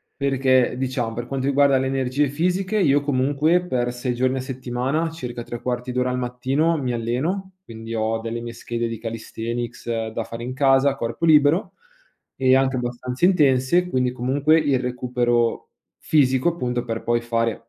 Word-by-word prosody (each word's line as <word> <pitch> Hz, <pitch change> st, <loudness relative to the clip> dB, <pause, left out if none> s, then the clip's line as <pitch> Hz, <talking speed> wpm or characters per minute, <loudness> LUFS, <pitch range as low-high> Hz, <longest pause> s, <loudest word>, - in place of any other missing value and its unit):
perché 130 Hz, -3 st, +2 dB
diciamo, 125 Hz, -3 st, -2 dB
per 120 Hz, +1 st, -4 dB
quanto 135 Hz, +1 st, -3 dB
riguarda 140 Hz, -1 st, +4 dB
le 130 Hz, -, -1 dB
energie 135 Hz, +2 st, 0 dB
fisiche 180 Hz, +7 st, 0 dB
io 145 Hz, -7 st, +3 dB
comunque 145 Hz, +5 st, +1 dB
per 120 Hz, -7 st, -1 dB
6 125 Hz, +1 st, -3 dB
giorni 130 Hz, +2 st, 0 dB
a -, -, -2 dB
settimana, 130 Hz, +4 st, -2 dB
circa 125 Hz, -7 st, -6 dB
3/4 125 Hz, +1 st, -4 dB
d'ora 125 Hz, 0 st, 0 dB
al 125 Hz, -, -2 dB
mattino 130 Hz, +7 st, 0 dB
mi 130 Hz, -4 st, -2 dB
alleno, 150 Hz, -, -2 dB
quindi 115 Hz, -4 st, -8 dB
ho 110 Hz, 0 st, 0 dB
delle 115 Hz, +1 st, -4 dB
mie 120 Hz, 0 st, -6 dB
schede 120 Hz, 0 st, -3 dB
di 115 Hz, -1 st, -5 dB
calisthenics 115 Hz, 0 st, -4 dB
da 115 Hz, +1 st, -3 dB
fare 115 Hz, +1 st, -8 dB
in 125 Hz, +1 st, -4 dB
casa, 135 Hz, 0 st, +4 dB
a -, -, -6 dB
corpo 120 Hz, +6 st, -2 dB
libero 155 Hz, +3 st, +4 dB, 0.6 s
ehm, 130 Hz, 0 st, +4 dB
anche 135 Hz, 0 st, 0 dB
abbastanza 125 Hz, +3 st, -3 dB
intense 150 Hz, -1 st, +3 dB
quindi 125 Hz, -5 st, +1 dB
comunque, 135 Hz, +6 st, +2 dB
il 140 Hz, -4 st, +1 dB
recupero 120 Hz, -2 st, 0 dB, 0.3 s
fisico 130 Hz, -1 st, +2 dB
appunto, 125 Hz, -8 st, -2 dB
per 115 Hz, -2 st, -4 dB
poi 120 Hz, 0 st, +1 dB
fare 115 Hz, -1 st, -2 dB
130 Hz, 165 wpm, -22 LUFS, 120-140 Hz, 0.6 s, riguarda